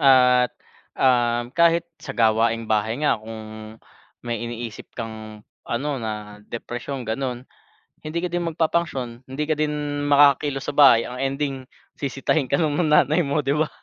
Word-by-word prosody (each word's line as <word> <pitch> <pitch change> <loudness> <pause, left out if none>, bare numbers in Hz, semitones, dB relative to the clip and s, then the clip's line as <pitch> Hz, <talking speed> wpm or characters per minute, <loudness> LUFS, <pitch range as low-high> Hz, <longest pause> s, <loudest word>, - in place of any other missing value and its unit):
at 125 -3 +5 0.5
um, 120 -1 +2
kahit 170 +1 +4 0.2
sa 135 -3 -7
gawaing 115 0 +2
bahay 110 +1 0
nga 115 -7 +2
kung 110 0 -9 0.5
may 120 -2 -3
iniisip 120 -1 -6
kang 110 -2 -7 0.2
ano 125 +5 -2
na, 105 -2 -6
depresyon 120 +2 -5
ganun, 125 +2 -3 0.6
hindi 155 +2 -3
ka - - +1
din 175 -1 -1
magpa-function 155 -7 -1
hindi 140 +3 -3
ka 155 - +2
din 150 -1 -2
makakakilos 140 -1 +4
sa - - -2
bahay 135 -6 +7
ang 125 +1 -7
ending 135 +1 -1 0.4
sisitahin 135 0 -1
ka - - +2
ng 155 0 +1
nanay 150 +3 +4
mo, 140 0 0
'di 140 - +2
ba? 155 0 +1
130 Hz, 150 wpm, -23 LUFS, 115-145 Hz, 0.6 s, bahay